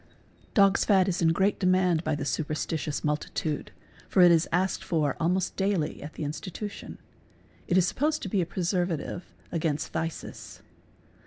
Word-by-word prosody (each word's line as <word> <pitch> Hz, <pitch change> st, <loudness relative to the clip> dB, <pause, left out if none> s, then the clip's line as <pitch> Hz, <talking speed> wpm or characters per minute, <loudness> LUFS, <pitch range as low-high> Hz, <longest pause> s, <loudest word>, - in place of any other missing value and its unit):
Dog's 200 Hz, -3 st, +5 dB
fat 190 Hz, -3 st, +4 dB
is 180 Hz, -2 st, -1 dB
in 165 Hz, -, +4 dB
great 195 Hz, +4 st, +1 dB
demand 185 Hz, -3 st, +3 dB
by 155 Hz, -2 st, 0 dB
the 145 Hz, -1 st, -4 dB
super 155 Hz, +1 st, -1 dB
stitious 155 Hz, -1 st, -3 dB
multitude, 150 Hz, 0 st, -2 dB, 0.4 s
for 185 Hz, -, +5 dB
it 175 Hz, -, +8 dB
is 165 Hz, 0 st, +3 dB
asked 185 Hz, +2 st, 0 dB
for 150 Hz, -5 st, 0 dB
almost 180 Hz, +2 st, 0 dB
daily 190 Hz, -6 st, 0 dB
at 150 Hz, +2 st, -8 dB
the -, -, -5 dB
institution; 160 Hz, +8 st, -6 dB, 0.7 s
it 180 Hz, -, +3 dB
is 185 Hz, -1 st, +4 dB
supposed 300 Hz, -, 0 dB
to -, -, -3 dB
be 190 Hz, 0 st, +1 dB
a -, -, 0 dB
preservative 175 Hz, -2 st, -2 dB, 0.2 s
against 155 Hz, -3 st, -1 dB
phthisis. 165 Hz, 0 st, -5 dB
175 Hz, 160 wpm, -28 LUFS, 155-190 Hz, 0.7 s, it